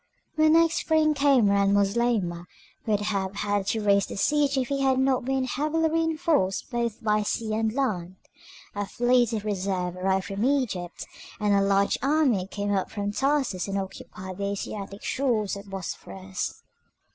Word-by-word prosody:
When 310 0 +4
next 330 0 +4
spring 315 -2 +2
came 280 -6 +4
round 200 0 +3
Moslemah 200 -4 0 0.4
would 210 -2 +1
have 200 -2 -2
had 205 -1 -1
to 220 -1 0
raise 200 -1 +3
the - - -7
siege 285 +4 +2
if 255 -2 0
he 275 -1 -1
had 265 -1 +3
not 265 -2 +1
been 265 0 0
heavily 305 +5 0
reinforced 315 - 0
both 235 -1 -2
by 210 -1 +2
sea 215 +1 -2
and 220 0 0
land. 195 -9 -2 0.6
A 205 -1 -3
fleet 245 0 +2
of 215 -2 -3
reserve 185 -3 -2
arrived 190 +1 0
from 200 +2 -3
Egypt, 245 -10 -1 0.3
and 210 -1 +2
a 200 - +4
large 195 0 +2
army 270 -9 +2
came 205 +1 -2
up 190 -1 0
from 205 -1 -3
Tarsus 270 -7 0
and 195 0 -2
occupied 190 -1 -7
the 200 - -1
Asiatic 200 0 -5
shores 230 -8 0
of 200 0 -9
the - - -15
Bosphorus. 95 - -6
210 Hz, 170 wpm, -26 LUFS, 195-270 Hz, 0.6 s, When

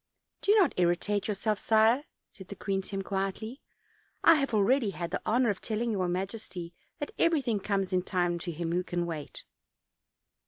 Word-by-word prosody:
"Do 415 +1 +4
not 380 -10 +4
irritate 180 +3 +1
yourself, 210 0 -1
sire," 225 +6 +4 0.2
said 190 - -13
the 200 - -7
queen 195 -1 -1
to 190 - -11
him 195 -1 -3
quietly; 195 +6 -3 0.6
"I 330 - +9
have 275 -3 0
already 220 +3 +3
had 170 -3 -5
the 180 - -2
honor 240 0 +3
of 195 - -6
telling 225 +1 -1
your 190 -4 0
majesty 185 -1 -4 0.2
that 290 - -5
everything 275 -10 +2
comes 195 -2 -1
in 180 - +3
time 175 -2 0
to 175 +1 -4
him 165 +1 -3
who 180 +1 +1
can 175 -1 -2
wait." 160 -4 -6
200 Hz, 180 wpm, -29 LUFS, 180-225 Hz, 0.6 s, I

